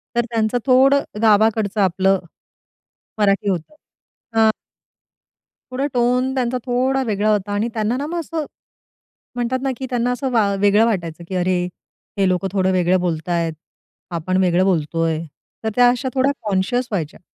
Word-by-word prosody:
तर 240 - +2
त्यांचं 225 +1 +1
थोडं 270 +2 +5 0.2
गावाकडचं 215 -1 +3
आपलं 190 +1 +2 1.0
मराठी 200 -1 +2
होतं. 180 - -3 0.7
अ 220 0 +6 1.2
थोडं 270 +3 -1
टोन 250 +2 +1
त्यांचा 255 -1 0
थोडा 260 +2 +1
वेगळा 210 0 +1
होता 205 -1 -1
आणि 210 +3 0
त्यांना 220 +2 -1
ना, 285 - -3
मग 345 +1 -3
असं 320 -1 -4 0.9
म्हणतात 245 +1 -1
ना, 270 - 0
की 265 - -5
त्यांना 245 0 0
असं 255 +1 -2
वा 210 -4 +2
वेगळं 205 +2 +4
वाटायचं 170 -6 -2
की 190 - -3
अरे, 180 0 +1 0.5
हे 195 -1 +3
लोकं 185 +1 0
थोडं 190 -1 +1
वेगळं 180 0 +2
बोलतायत, 170 -1 -1 0.6
आपण 175 +2 -1
वेगळं 180 +1 +3
बोलतोय. 165 -2 0 0.4
तर 220 - 0
त्या 245 0 +6
अशा 250 +1 -1
थोड्या 265 +2 +3 0.2
कॉन्शीयस 210 +6 0
व्हायच्या. 165 -6 -3
215 Hz, 150 wpm, -20 LUFS, 185-250 Hz, 1.2 s, अ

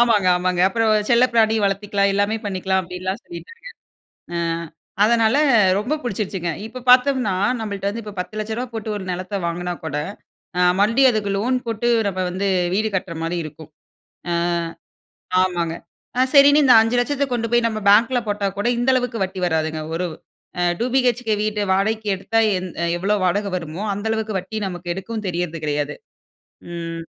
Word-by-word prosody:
ஆமாங்க. 230 -5 +4
ஆமாங்க. 180 0 0
அப்புறம் 225 +1 +1 0.2
செல்ல 240 +1 +5
பிராணி 225 -1 +4
வளர்த்திக்கலாம். 200 0 +1
எல்லாமே 205 +2 +1
பண்ணிக்கலாம். 190 -1 0
அப்பிடின்லாம் 185 +4 -5
சொல்லிட்டாங்க. 460 +7 -11 0.7
அ - - -1 0.7
அதனால 230 +2 +3 0.4
ரொம்ப 240 +9 -1
புடிச்சிருச்சுங்க. 195 -6 -3
இப்ப, 240 +3 -8
பார்த்தோம்னா, 250 -3 +5 0.3
நம்மள்ட்ட 200 -2 -4
வந்து, 225 +3 -4
இப்போ 210 -1 -8
ரூ.1000000 220 +5 -4
போட்டு 220 -1 -5
ஒரு 195 - -5
நிலத்த 185 +3 -4
வாங்குனா 175 +1 -2
கூட, 155 -2 -3 0.6
அ - - +2 0.2
மறுபடியும், 230 +6 +5
அதுக்கு 205 -2 -1
லோன் 250 +6 +1
போட்டு, 230 +1 -1 0.2
நம்ம 190 -2 -2
வந்து 195 +2 -1 0.3
வீடு 215 +2 +1
கட்ற 185 -2 -4
மாரி 170 +2 -2
இருக்கும். 155 0 -11 1.6
அ - - +4
ஆமாங்க. 170 -3 -1 0.4
அ - - +5
சரின்னு 285 +1 +7
இந்த 255 -3 +7
500000ஐ 245 +5 +1
கொண்டு 230 -2 -1
போய் 240 0 +3
நம்ம 215 -1 -4
பேங்க்ல 230 +4 +4
போட்டா 205 -1 0
கூட 205 +4 +1
இந்த 245 +2 +2
அளவுக்கு 245 -4 -1
வட்டி 185 0 -6
வராதுங்க. 160 -1 -1
ஒரு 180 +2 -1 0.5
அ - - +2 0.2
டூ - - +1
பிஹெச்கே 245 -4 +2
வீட்ட 215 -1 -1
வாடகைக்கு 215 +3 0
எடுத்தா, 200 +4 -1 0.2
எந் 180 0 -6 0.3
எவ்ளோ 205 +3 +1
வாடகை 200 +3 0
வருமோ, 165 +2 -6
அந்த 205 +2 -5
அளவுக்கு 220 -1 -2
வட்டி 190 +4 -5
நமக்கு 175 -1 -4
எடுக்கவும் 215 +3 -5
தெரியறது 170 -2 -3
கிடையாது. 150 0 -2 0.8
ம். 165 -1 -5
205 Hz, 155 wpm, -21 LUFS, 185-230 Hz, 1.6 s, சரின்னு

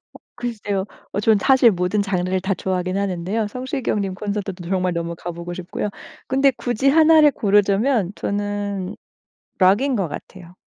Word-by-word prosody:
어 - - -19
글쎄요. 205 -5 -3 0.3
어 200 - -1
저는 215 0 +4
사실 260 0 +5
모든 180 +2 0
장르를 185 -1 -1
다 190 +1 -1
좋아하긴 185 +1 -2
하는데요. 200 +3 -1
성시경 255 -1 -2
님 195 -2 -3
콘서트도 200 -3 -4
정말 185 -1 0
너무 170 0 -3
가보고 170 +1 -6
싶고요. 185 +3 -4 0.4
근데 270 +1 +3
굳이 245 +2 0
1 315 +2 +6
를 300 -1 +7
고르자면 205 -1 +2
저는 205 -1 -3 0.6
록인 210 +9 +4
것 195 -6 0
같아요. 175 +3 -10
200 Hz, 325 characters per minute, -21 LUFS, 185-225 Hz, 0.6 s, 를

